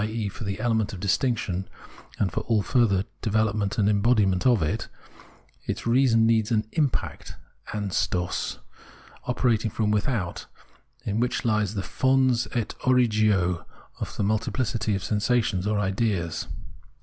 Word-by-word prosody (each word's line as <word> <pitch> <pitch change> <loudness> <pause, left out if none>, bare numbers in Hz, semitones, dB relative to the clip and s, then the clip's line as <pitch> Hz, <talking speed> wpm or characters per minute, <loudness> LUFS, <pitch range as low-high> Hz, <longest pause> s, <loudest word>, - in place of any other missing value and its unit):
e. 110 0 -2
for 100 +2 -7
the 100 0 -3
element 110 -4 0
of 95 - -6
distinction 100 -2 0 0.5
and 95 -5 0
all 110 +1 0
the - - -13
further 105 -7 +3 0.2
development 110 -1 0
and 105 -2 +3
embodiment 100 -2 +3
of 120 -9 +4
it, 75 - -2 0.8
its - - -3
reason 115 -2 +4
needs 110 -2 +2
an 110 -2 +1
impact 150 -6 -2 0.4
{Anstoss) 95 -4 -1 0.7
operating 120 -3 +1
from 105 0 0
without, 105 -4 -1 0.6
in 105 +1 -1
which 125 +1 -1
lies 105 -2 +1
the 100 - -2
fons 130 -1 +2
ei 115 -3 +1 0.2
origo 110 -8 +2 0.4
of - - -5
the - - 0
multiplicity 110 +1 0
of 95 - -4
sensations 105 -3 +1
or 105 0 +1
ideas. 95 -4 -1
110 Hz, 135 wpm, -25 LUFS, 100-115 Hz, 0.8 s, of